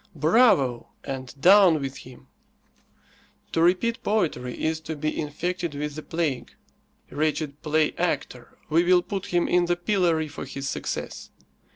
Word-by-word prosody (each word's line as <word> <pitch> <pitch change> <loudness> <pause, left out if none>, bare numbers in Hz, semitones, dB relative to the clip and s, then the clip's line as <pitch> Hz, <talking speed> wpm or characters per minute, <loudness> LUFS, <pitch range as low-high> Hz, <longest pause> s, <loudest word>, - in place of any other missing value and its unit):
"Bravo!" 150 - +3 0.2
and 130 0 -7
"Down 185 0 +6
with 135 -1 -5
him!" 125 -1 -13 1.3
To 165 - 0
repeat 230 +8 +2
poetry 155 - -1
is 160 0 0
to 160 0 -6
be 155 +1 -2
infected 170 +2 -3
with 150 +1 -4
the 155 - -7
plague. 155 -6 -3 0.6
Wretched 150 -1 -2
playactor, 155 -1 -1
we 165 +3 +3
will 180 0 +4
put 195 0 -5
him 175 -1 +1
in 175 0 +3
the 175 0 +1
pillory 175 -4 +1
for 145 - -8
his 135 +1 -6
success. - - -5
160 Hz, 140 wpm, -25 LUFS, 145-175 Hz, 1.3 s, Down